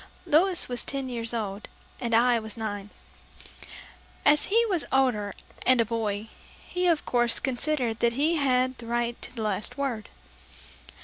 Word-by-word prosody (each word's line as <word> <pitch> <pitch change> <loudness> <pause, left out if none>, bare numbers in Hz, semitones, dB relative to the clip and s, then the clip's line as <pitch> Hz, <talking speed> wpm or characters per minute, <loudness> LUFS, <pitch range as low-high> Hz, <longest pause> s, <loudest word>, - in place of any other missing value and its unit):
Louis 355 +3 +3
was 245 -1 0
ten 275 -2 -3
years 230 -2 -1
old 210 -3 -4 0.3
and 235 -2 0
I 240 0 +4
was 220 0 -7
nine. 205 -2 -4 1.4
As 295 +1 +6
he 460 +4 +3
was 370 -8 0
older 240 -7 +1 0.3
and 255 -1 +4
a 230 - +4
boy, 215 -2 -2 0.4
he 360 0 -1
of 330 -3 +2
course, 240 -1 +2
considered 255 -3 -1
that 235 0 +2
he 305 +6 +2
had 255 -2 +1
the 230 - -7
right 240 0 -1
to - - -5
the 225 - -4
last 210 +3 -2
word. 255 -6 -3
240 Hz, 160 wpm, -27 LUFS, 225-280 Hz, 1.4 s, As